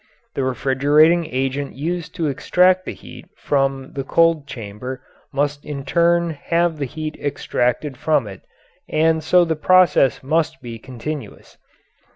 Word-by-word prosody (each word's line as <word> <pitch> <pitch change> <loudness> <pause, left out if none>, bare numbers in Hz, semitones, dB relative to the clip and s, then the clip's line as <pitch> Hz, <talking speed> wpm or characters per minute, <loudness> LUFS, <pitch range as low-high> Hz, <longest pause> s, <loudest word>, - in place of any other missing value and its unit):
The 135 - -2
refrigerating 145 +7 +3
agent 135 +1 -2
used 165 +3 -4
to 170 -3 -2
extract 180 +6 +2
the - - -5
heat - - -13
from 135 -1 -1
the 135 - -3
cold 165 0 +2
chamber 125 +3 -7 0.3
must 145 +1 -1
in 140 -2 -6
turn 170 +2 +2
have 165 +1 -1
the 140 - -1
heat 155 +3 -6
extracted 135 -1 -1
from 150 -3 +1
it, 95 -2 -10 0.5
and 160 0 +2
so 175 +2 +4
the 160 -1 -1
process 175 -5 +3
must 155 0 0
be 115 -3 -8
continuous. 130 +5 -8
145 Hz, 140 wpm, -20 LUFS, 135-165 Hz, 0.5 s, so